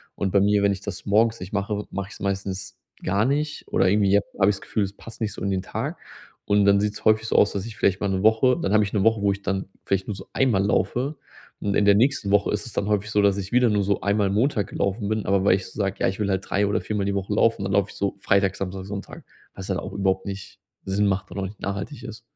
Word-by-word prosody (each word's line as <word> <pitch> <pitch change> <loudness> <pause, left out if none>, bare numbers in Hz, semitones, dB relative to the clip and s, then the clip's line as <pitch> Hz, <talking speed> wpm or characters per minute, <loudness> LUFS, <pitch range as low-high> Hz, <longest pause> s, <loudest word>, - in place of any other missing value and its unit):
Und 95 -2 -1
bei 100 - +4
mir, 100 0 +3
wenn 100 - +4
ich 100 - -7
das - - -6
morgens 110 +3 +3
nicht 90 +3 -8
mache, 105 +1 -2
mache 100 0 -4
ich - - -11
es - - -14
meistens 95 -1 -3 0.3
gar 100 +3 +1
nicht 145 +3 -1
oder 95 - +2
irgendwie 100 0 +3
je 100 - +6 0.2
habe 95 0 +5
ich 105 - +1
das - - -12
Gefühl, 105 - -1
es 100 0 -4
passt 115 0 -12
nicht 105 -3 -1
so - - -10
in 100 - 0
den 95 -1 0
Tag. - - -4 0.5
Und 100 0 +3
dann 100 0 +5
sieht's 105 0 -3
häufig 110 0 +4
so - - +1
aus, 105 - +4
dass 100 +1 -3
ich 115 -2 -9
vielleicht 95 0 +1
mal 100 - 0
'ne 95 -1 0
Woche 110 +4 +4
dann 95 - 0
habe 105 0 +5
ich 100 - -3
'ne 105 - 0
Woche, 115 -2 +3
wo 100 -1 +3
ich 100 - -4
dann 95 -1 -1 0.2
vielleicht 95 -1 0
nur 105 - -3
so 95 - -11
einmal 120 -8 +2
laufe. 130 +7 0 0.5
Und 100 - -1
in 105 - +3
der 100 0 +6
nächsten 115 -3 +2
Woche 100 0 +3
ist 105 +2 -2
es 120 - -9
dann 100 - -1
häufig 105 0 0
so, 105 - +3
dass 100 -1 +3
ich 100 +2 -5
wieder 125 -1 +4
nur 105 -1 +2
so 100 0 0
einmal 100 0 +1
Montag 105 0 +1
gelaufen 100 +1 -2
bin, 110 0 -1
aber 95 0 +2
weil 95 - +5
ich 95 -1 -5
sage: 100 -2 -2
„Ja, - - +2
ich 95 - -6
will 105 -1 0
halt 95 -1 0
drei 100 +1 +2
oder 100 - 0
viermal 105 -2 -2
die 100 0 -1
Woche 100 +1 -2
laufen.”, 115 -1 +2
dann 95 - -2
laufe 100 0 +2
ich - - -15
so 100 0 -2
Freitag, 95 0 +2
Samstag, 95 0 -4
Sonntag, 100 0 -7 0.3
was 95 0 -8
halt 95 0 0
auch - - -7
überhaupt 95 -1 0
nicht 100 -1 -7 0.3
Sinn 100 +2 +1
macht 100 0 -1
und - - -5
auch 95 - -2
nicht 100 +2 -9
nachhaltig 100 0 -5
ist. - - -8
100 Hz, 285 wpm, -24 LUFS, 95-105 Hz, 0.5 s, je